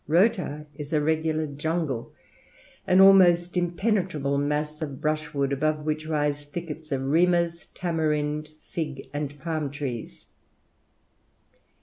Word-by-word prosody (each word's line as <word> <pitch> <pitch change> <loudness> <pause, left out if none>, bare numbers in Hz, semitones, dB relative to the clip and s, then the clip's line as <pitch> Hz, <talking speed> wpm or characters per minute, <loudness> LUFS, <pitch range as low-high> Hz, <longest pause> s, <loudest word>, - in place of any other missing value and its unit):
Rota 165 -3 +2
is 145 +1 -7
a 155 - +4
regular 155 +1 +1
jungle, 150 -3 -2 0.8
an 185 - +5
almost 180 -3 +6
impenetrable 175 -5 0
mass 150 +2 -1
of 140 -4 -4
brushwood, 150 -2 -1
above 150 +2 0
which 155 0 -2
rise 145 -2 0
thickets 155 0 -7
of 135 -1 0
rimas, 170 +2 +2
tamarind, 150 -3 -1 0.2
fig, 150 -5 -4
and 145 0 -4
palm 155 -3 -2
trees. 130 - -6
155 Hz, 110 wpm, -26 LUFS, 145-170 Hz, 0.8 s, almost